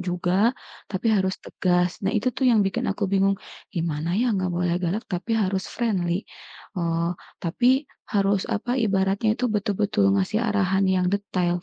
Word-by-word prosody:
juga, 185 Hz, +6 st, +1 dB, 0.4 s
tapi 190 Hz, +3 st, -2 dB
harus 190 Hz, -2 st, +2 dB
tegas. 180 Hz, -1 st, +1 dB
Nah 195 Hz, -, +1 dB
itu 250 Hz, +4 st, +1 dB
tuh 265 Hz, -, +2 dB
yang 225 Hz, -3 st, +4 dB
bikin 195 Hz, -, -2 dB
aku 200 Hz, +1 st, -2 dB
bingung, 195 Hz, 0 st, +3 dB, 0.4 s
gimana 165 Hz, +1 st, -1 dB
ya 245 Hz, -2 st, +2 dB
enggak 185 Hz, -1 st, 0 dB
boleh 175 Hz, -1 st, +1 dB
galak, 185 Hz, +6 st, -1 dB
tapi 185 Hz, +6 st, -2 dB
harus 190 Hz, -2 st, 0 dB
friendly, 190 Hz, -6 st, -1 dB, 0.5 s
eee, 170 Hz, 0 st, 0 dB, 0.3 s
tapi 255 Hz, -, +2 dB, 0.3 s
harus, 200 Hz, -1 st, +2 dB
apa, 245 Hz, +5 st, -1 dB
ibaratnya 200 Hz, -1 st, +1 dB
itu 250 Hz, -, 0 dB
betul-betul 205 Hz, 0 st, +1 dB
ngasih 210 Hz, +4 st, 0 dB
arahan 195 Hz, -2 st, +2 dB
yang 185 Hz, -1 st, +2 dB
detail. 180 Hz, -3 st, 0 dB
195 Hz, 155 wpm, -24 LUFS, 180-210 Hz, 0.5 s, yang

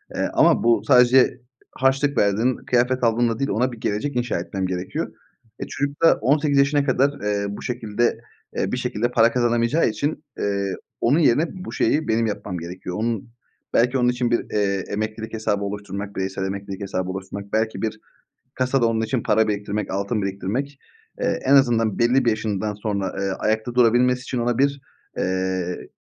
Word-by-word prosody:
eee, -, -, 0 dB
ama -, -, +4 dB
bu 115 Hz, -3 st, +3 dB
sadece 125 Hz, 0 st, +5 dB, 0.3 s
harçlık 135 Hz, +2 st, +1 dB
verdin, 110 Hz, +5 st, +2 dB
kıyafet 125 Hz, +1 st, +2 dB
aldınla 115 Hz, 0 st, +2 dB
değil, 140 Hz, 0 st, 0 dB
ona 125 Hz, +5 st, +1 dB
bir 120 Hz, -, -9 dB
gelecek 110 Hz, +7 st, -2 dB
inşa 120 Hz, -6 st, -1 dB
etmem 95 Hz, +2 st, -3 dB
gerekiyor. 90 Hz, 0 st, -4 dB, 0.5 s
E, -, -, -5 dB
çocuk 145 Hz, 0 st, -3 dB
da 165 Hz, -, +7 dB
18 145 Hz, +4 st, +2 dB
yaşına 140 Hz, +1 st, +3 dB
kadar, 135 Hz, +1 st, +2 dB
eee, 105 Hz, -1 st, 0 dB
bu 100 Hz, -, -7 dB
şekilde, 120 Hz, -1 st, -1 dB, 0.4 s
eee, 95 Hz, -, 0 dB
bir -, -, -1 dB
şekilde 125 Hz, -1 st, -1 dB
para 115 Hz, -1 st, +4 dB
kazanamayacağı 120 Hz, +4 st, +2 dB
için, 145 Hz, +8 st, -3 dB, 0.2 s
eee, 100 Hz, -1 st, -1 dB, 0.3 s
onun 140 Hz, +7 st, +3 dB
yerine 150 Hz, +1 st, +3 dB, 0.2 s
bu -, -, -6 dB
şeyi 155 Hz, +1 st, +1 dB
benim 115 Hz, +1 st, +2 dB
yapmam 100 Hz, -3 st, -4 dB
gerekiyor. 90 Hz, +1 st, -6 dB
Onun, 115 Hz, -1 st, -2 dB, 0.4 s
belki 125 Hz, +3 st, +3 dB
onun 125 Hz, -1 st, +3 dB
için 125 Hz, -1 st, 0 dB
bir, 120 Hz, -, +1 dB
eee, 100 Hz, -2 st, 0 dB
emeklilik 110 Hz, +2 st, -4 dB
hesabı 105 Hz, -2 st, -1 dB
oluşturmak, 100 Hz, 0 st, -5 dB
bireysel 95 Hz, 0 st, -3 dB
emeklilik 100 Hz, 0 st, -5 dB
hesabı 95 Hz, -2 st, -3 dB
oluşturmak. 95 Hz, +1 st, -7 dB
Belki 110 Hz, -3 st, 0 dB
bir 110 Hz, -1 st, -3 dB, 0.5 s
kasada 130 Hz, -1 st, +1 dB
onun 115 Hz, -1 st, 0 dB
için 115 Hz, +1 st, -1 dB
para 110 Hz, +1 st, +3 dB
biriktirmek, 105 Hz, 0 st, -2 dB
altın 100 Hz, +3 st, -1 dB
biriktirmek, 100 Hz, +9 st, -3 dB, 0.4 s
eee, 250 Hz, 0 st, 0 dB
en 135 Hz, -, +4 dB
azından 115 Hz, -6 st, +3 dB
belli 125 Hz, +2 st, +3 dB
bir -, -, +5 dB
yaşından 110 Hz, -1 st, -1 dB
sonra, 100 Hz, -2 st, -3 dB
eee, 100 Hz, 0 st, -1 dB
ayakta 110 Hz, +3 st, -1 dB
durabilmesi 125 Hz, +1 st, +4 dB
için 130 Hz, -, -4 dB
ona 120 Hz, 0 st, 0 dB
bir, 140 Hz, 0 st, +1 dB, 0.4 s
eee, 95 Hz, -1 st, -2 dB
115 Hz, 170 wpm, -22 LUFS, 100-125 Hz, 0.5 s, da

